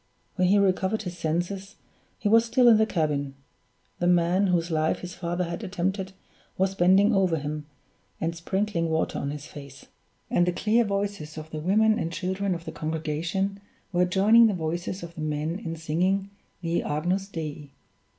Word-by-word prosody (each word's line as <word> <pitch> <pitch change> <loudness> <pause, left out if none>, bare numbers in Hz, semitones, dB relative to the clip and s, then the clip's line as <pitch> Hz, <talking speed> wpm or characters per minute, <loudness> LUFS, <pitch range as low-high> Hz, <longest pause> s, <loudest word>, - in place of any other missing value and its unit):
When 185 -1 +2
he 200 +3 +5
recovered 195 +2 +1
his 180 -3 -5
senses, 175 +4 -3 0.4
he 210 - -2
was 225 +2 +6
still 245 +2 +3
in 230 -2 +8
the 220 0 +3
cabin; 145 -6 -1 0.6
the 175 - +1
man 175 +3 +3
whose 175 -2 +1
life 155 0 +1
his 180 0 -7
father 175 0 -2
had 170 +5 -5
attempted 190 0 -2 0.4
was 190 +1 +1
bending 195 +4 +4
over 185 -4 +2
him, 150 0 -5 0.5
and 165 +1 -2
sprinkling 175 0 -1
water 160 0 0
on 140 - -2
his 145 0 -6
face; 140 -3 -11 0.5
and 175 - +3
the 180 - +1
clear 220 +5 +2
voices 200 -6 -3
of 155 0 -8
the 155 - -4
women 215 +7 +3
and 165 - -2
children 185 +3 -1
of 170 0 -8
the - - -5
congregation 165 +5 -2 0.3
were 180 +1 +3
joining 210 +6 +6
the 210 - 0
voices 170 +3 -3
of 170 0 -8
the 160 - -8
men 155 +3 -2
in 165 -7 -5
singing 185 +5 0 0.3
the 170 -1 0
_Agnus 180 +6 -1
Dei. 150 -4 -6
175 Hz, 175 wpm, -26 LUFS, 160-195 Hz, 0.6 s, in